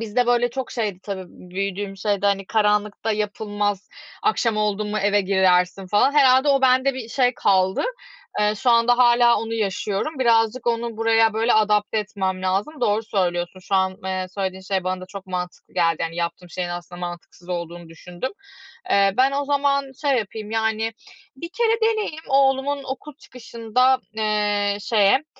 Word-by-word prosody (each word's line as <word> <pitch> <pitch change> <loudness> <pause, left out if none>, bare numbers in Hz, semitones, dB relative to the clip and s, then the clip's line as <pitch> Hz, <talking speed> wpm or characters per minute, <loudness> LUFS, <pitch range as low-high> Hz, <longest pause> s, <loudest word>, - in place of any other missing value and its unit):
bizde 230 +2 0
böyle 245 0 +2
çok 260 +1 -5
şeydi 210 -6 -2
tabii, 195 -2 -5
büyüdüğüm 195 +2 -5
şeyde, 200 +1 0
hani, 195 -1 0
"Karanlıkta 210 0 +1
yapılmaz, 205 -1 -2 0.3
akşam 235 - +1
oldum 210 0 -1
mu 215 - -1
eve 205 +1 +2
girersin." 185 -1 +2
falan. 210 +8 +3
Herhâlde 265 -1 +5
o 275 -1 +4
bende 260 +1 +3
bir 250 -3 -7
şey 250 0 +1
kaldı. 190 -2 +2 0.6
Eee, 210 0 +2
şu 245 - +1
anda 235 +1 +4
hâlâ 240 -1 +5
onu 225 0 -4
yaşıyorum. 210 +6 -2
Birazcık 230 0 +2
onu 235 -1 -1
buraya 225 0 +3
böyle 225 +2 +2
adapte 210 0 +2
etmem 190 -3 -3
lazım. 200 +11 -2
Doğru 210 -1 +1
söylüyorsun, 180 -3 -2
şu 195 +1 -3
an, 190 0 +1
eee, 185 -1 -2
söylediğin 190 -1 -3
şey 190 -1 -2
bana 185 0 -2
da 185 - -9
çok 195 -1 -9
mantıklı 180 -1 -6
geldi. 165 -2 +1
Hani, 165 0 -3
yaptığım 175 +1 -4
şeyin 180 0 -3
aslında 175 0 -7
mantıksız 175 0 -8
olduğunu 170 -1 -5
düşündüm. 175 +7 -7 0.6
Eee, 195 -1 +3
ben 265 +2 +3
o 285 +1 -1
zaman 280 -1 0
şey 275 -4 +2
yapayım, 215 0 -6
yani, 220 0 -1 0.4
1 335 +5 -7
kere 455 +3 0
deneyeyim. 430 -8 0
Oğlumun 275 +1 +2
okul 270 +3 -7
çıkışında, 250 +1 0 0.2
eee, 205 -1 0
şeye, 215 +7 +3
210 Hz, 165 wpm, -22 LUFS, 190-245 Hz, 0.6 s, Herhâlde